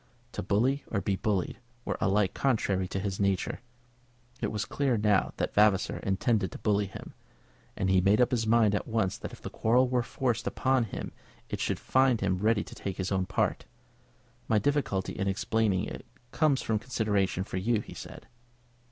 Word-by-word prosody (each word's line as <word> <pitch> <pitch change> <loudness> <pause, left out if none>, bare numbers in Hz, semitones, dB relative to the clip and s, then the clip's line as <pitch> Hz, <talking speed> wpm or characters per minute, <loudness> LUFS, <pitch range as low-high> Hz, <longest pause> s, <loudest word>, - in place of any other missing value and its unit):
To - - -4
bully 120 +9 +1
or 100 - -1
be 100 0 0
bullied 100 +1 -1 0.3
were - - -2
alike 100 -1 +2
contrary 100 -8 +1
to 95 - -3
his 95 -1 -3
nature. 100 -2 0 0.8
It - - -1
was 105 -1 -2
clear 140 -4 0
enough 105 - -2
now 105 -3 +3
that - - -2
Vavasor 105 +2 +3
intended 100 -1 0
to - - -6
bully 105 -1 +1
him, 95 - -10 0.6
and 95 - 0
he 95 -1 +4
made 100 +3 +4
up 125 +1 +4
his 115 -3 0
mind 110 -2 +4
at 105 - -1
once 110 -5 0
that - - -6
if - - -13
the - - -6
quarrel 125 +3 +3
were 125 -1 +1
forced 120 -1 -2
upon 130 -1 +1
him 105 - -6 0.4
it - - -3
should - - -1
find 130 -3 +3
him 95 -2 0
ready 110 +1 +2
to - - -12
take 95 -2 -5
his 95 0 -2
own 95 -1 0
part. - - 0 0.8
"My 110 - +3
difficulty 105 -5 0
in 100 -2 -2
explaining 105 -1 +1
it - - -7 0.3
comes 150 -4 +2
from 110 -1 0
consideration 105 -6 0
for 95 - -5
you," 110 +4 +1
he - - -11
said. - - -10
105 Hz, 190 wpm, -29 LUFS, 95-120 Hz, 0.8 s, he